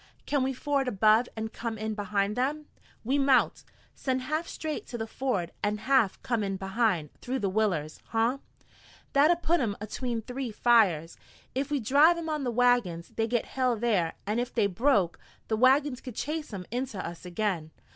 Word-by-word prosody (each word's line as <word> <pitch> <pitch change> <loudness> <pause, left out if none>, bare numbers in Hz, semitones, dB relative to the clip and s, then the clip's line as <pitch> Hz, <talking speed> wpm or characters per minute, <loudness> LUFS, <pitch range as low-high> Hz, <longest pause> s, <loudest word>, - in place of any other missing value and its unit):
"Can 285 -2 +1
we 260 +1 +1
ford 275 +1 -1
above 220 +1 +4
and 220 0 -4
come 230 -2 -4
in 220 0 -3
behind 205 0 -1
them?" 290 +4 -1 0.4
"We 265 +5 +1
mout. 270 -1 +3 0.3
Send 260 -1 -2
half 310 +5 -2
straight 310 -1 -5
to 240 - -5
the 225 - -3
ford 220 -7 -2
an' 205 +1 0
half 255 -3 +2
come 235 -3 0
in 195 -1 -2
behind, 190 -5 0
through 255 +2 -2
the 200 -6 -1
willers, 185 -8 -1
huh? 230 +4 +1 0.7
That'd 320 +5 +4
put 340 +2 +3
'em 215 -5 -1
atween 230 +2 -3
three 250 +2 -4
fires. 205 -9 +3 0.4
Ef 275 +2 -1
we 290 -1 0
driv' 290 +9 +5
'em 330 -1 -4
on 305 -2 -1
the 250 - 0
wagons 235 -9 +2
they'd 225 0 -2
get 240 -1 0
hell 255 -3 0
thar, 205 -8 +1
an' 210 +3 0
ef 245 0 -2
they 225 -4 +2
broke, 200 -3 +2 0.3
the 220 - +2
wagons 260 +3 +3
could 250 -5 -8
chase 305 +2 -3
'em 190 -3 -6
inter 245 -2 -3
us 170 -1 -6
again. 180 -3 -2
235 Hz, 185 wpm, -28 LUFS, 205-265 Hz, 0.7 s, driv